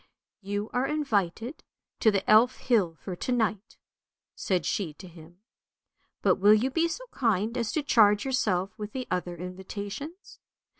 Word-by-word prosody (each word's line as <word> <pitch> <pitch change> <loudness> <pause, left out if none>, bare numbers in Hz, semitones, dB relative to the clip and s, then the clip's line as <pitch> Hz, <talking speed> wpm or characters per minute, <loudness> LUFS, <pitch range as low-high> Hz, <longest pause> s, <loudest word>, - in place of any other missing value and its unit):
" - - -65
You 205 +1 -2
are 250 +2 +1
invited 240 - -1 0.4
to 220 - +5
the 200 -2 0
Elf 230 +4 +5
hill 200 -10 +1
for 180 +3 -7
to 255 - -3
night," 220 -3 -1 0.6
said 180 -4 -1
she 175 -7 -1
to 185 - -11
him. 170 +1 -15 0.4
" - - -48
But - - +4
will 205 +2 +6
you 250 +5 0
be 330 +4 +2
so - - -5
kind 225 -2 0
as 230 -4 -1
to 310 - 0
charge 210 -6 +4
yourself 200 -8 0
with 210 0 -6
the 255 -1 -4
other 180 -1 -2
invitations. 200 - -7
210 Hz, 165 wpm, -28 LUFS, 185-250 Hz, 0.6 s, will